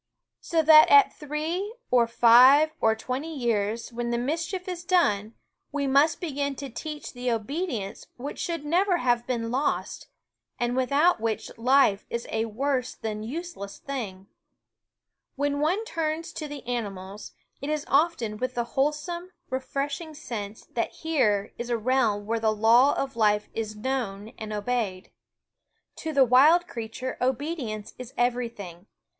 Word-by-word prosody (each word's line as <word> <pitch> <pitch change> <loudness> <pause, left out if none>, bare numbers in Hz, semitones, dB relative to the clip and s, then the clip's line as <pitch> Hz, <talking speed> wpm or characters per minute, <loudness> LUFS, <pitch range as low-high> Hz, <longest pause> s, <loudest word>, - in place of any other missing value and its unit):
So 330 -2 0
that 310 0 +8
at 425 -1 +7
three 320 +8 -3 0.2
or 240 -2 +4
five 255 +6 +7
or 220 0 +4
twenty 270 +7 -4
years, 230 -1 -1
when 240 0 -3
the 235 - 0
mischief 330 +9 -3
is 355 -2 -5
done, 220 - +1 0.4
we 285 -1 -1
must 280 +3 +3
begin 285 -4 -2
to 275 -1 -7
teach 300 +5 -6
the 250 0 -3
obedience 230 - -3
which 275 +4 -6
should 335 -4 -3
never 360 +4 +2
have 240 -5 +1
been 230 -2 -2
lost, 265 +4 -2 0.5
and 240 0 -1
without 280 +3 +3
which 225 -1 -3
life 240 -4 +3
is 235 0 -3
a 220 0 0
worse 255 +3 -2
than 215 -1 -4
use 330 +10 -5
less 200 0 -8
thing. 210 -9 -6 0.6
* - - -63 0.3
When 285 +1 -1
one 360 +9 +1
turns 325 -4 -3
to 305 - -5
the 290 -3 -8
animals, 205 -4 -5 0.3
it 280 - -4
is 305 -1 -1
often 275 -8 +1
with 255 +2 -3
the 240 - 0
wholesome, 300 +6 -1 0.2
refresh 275 +2 -2
"^ - - -10
ing 315 -2 -9
sense 220 -8 -6
that 230 - -1
here 215 -11 0
is 240 0 -4
a 240 - +1
realm 225 -3 +1
where 230 +2 -1
the 220 -1 +2
law 235 +6 +5
of 270 -2 -3
life 210 -2 +2
is 215 -1 -4
known 215 -4 -3
and 215 -1 -6
obeyed. 210 -3 -2 0.9
To 320 - -4
the 275 -3 +5
wild 290 +8 +6
s 350 - -26
creature 230 +3 -5
obedience 255 -4 -2
is 250 0 -9
everything. 230 -7 -2
255 Hz, 160 wpm, -26 LUFS, 225-300 Hz, 0.9 s, that